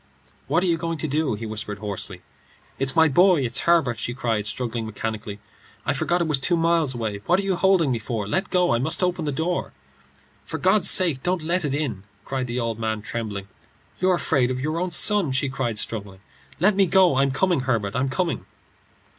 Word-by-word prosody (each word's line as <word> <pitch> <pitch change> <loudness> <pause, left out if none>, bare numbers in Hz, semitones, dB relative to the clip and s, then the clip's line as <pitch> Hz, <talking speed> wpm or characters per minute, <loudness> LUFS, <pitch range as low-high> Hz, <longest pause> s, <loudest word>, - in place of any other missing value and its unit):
"What 175 - +1
are - - +1
you 170 -2 +1
going 165 0 -3
to 155 - -3
do?" 150 -4 0
he 115 +2 -7
whispered 105 -1 -3
hoarsely. 100 -1 -6 0.6
"It's 135 0 0
my 160 -1 +6
boy; 175 +2 +4
it's 120 -2 -1
Herbert!" 135 -10 +3
she 120 +2 -3
cried, 115 -5 -1
struggling 115 0 -3
mechanically. 105 -1 -5 0.5
"I - - +1
forgot 175 +1 0
it 170 - 0
was 150 -3 +2
two 175 +5 +2
miles 165 -5 +1
away. 110 -3 -3
What 175 +2 +3
are - - -2
you 195 -1 0
holding 185 -6 +3
me 120 - -1
for? 110 -2 -4
Let 185 - -1
go. 180 -6 +2
I 120 - +1
must 160 +7 +1
open 180 -2 -1
the 145 - -1
door." 165 +5 -2 0.7
"For - - -5
God's 190 0 +4
sake 165 -8 +5
don't 180 0 -1
let 175 +3 0
it 140 -2 -1
in," 135 -10 -3 0.2
cried 130 -1 -3
the 120 +1 -3
old 115 -2 -3
man, 110 -2 -2
trembling. 105 -4 -5 0.5
"You're 185 0 +3
afraid 135 -7 +1
of 130 0 -3
your 155 +5 -2
own 180 +1 -1
son," 180 -3 +4
she 135 +1 0
cried, 125 -5 -3
struggling. 100 -3 -5 0.4
"Let 195 +4 +3
me 195 -1 +3
go. 180 -5 +4
I'm 135 0 +3
coming, 175 +4 +1
Herbert; 115 -6 -1
I'm 130 +2 0
coming." 170 +4 -2
135 Hz, 210 wpm, -23 LUFS, 115-175 Hz, 0.7 s, my